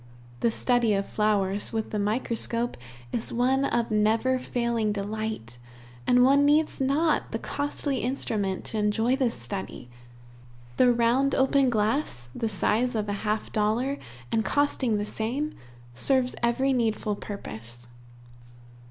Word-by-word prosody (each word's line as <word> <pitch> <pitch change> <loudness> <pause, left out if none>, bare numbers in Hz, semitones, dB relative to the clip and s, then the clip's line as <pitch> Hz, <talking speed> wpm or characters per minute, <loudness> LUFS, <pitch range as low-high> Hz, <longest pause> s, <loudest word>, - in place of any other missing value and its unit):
The 235 - +2
study 235 -2 +2
of 195 0 -1
flowers 205 -2 0
with 220 -1 -3
the 210 - -1
microscope 230 +2 -1 0.4
is 225 - -2
one 260 +3 +2
of 235 -3 0
never 220 +5 +2
failing 235 -3 -1
delight, 205 - -4 0.5
and 250 0 +5
one 275 +2 +5
needs 300 0 +2
not 295 +4 +1
the - - -1
costly 285 -1 -2
instrument 215 -7 -2
to 220 - -2
enjoy 220 +4 +2
this 260 -4 0
study. 115 0 -6 0.9
The 250 -1 +6
round 240 +4 +2
open 270 0 +3
glass, 215 - -1
the 225 - -2
size 225 +4 +1
of 210 -1 -1
a - - 0
half 215 0 -2
dollar, 230 +7 0 0.3
and 220 - +2
costing 265 -6 +1
the 205 - -2
same, 250 +9 -2 0.4
serves 255 - +2
every 260 +3 +2
needful 220 -3 0
purpose. 120 - -7
230 Hz, 135 wpm, -27 LUFS, 210-260 Hz, 0.9 s, The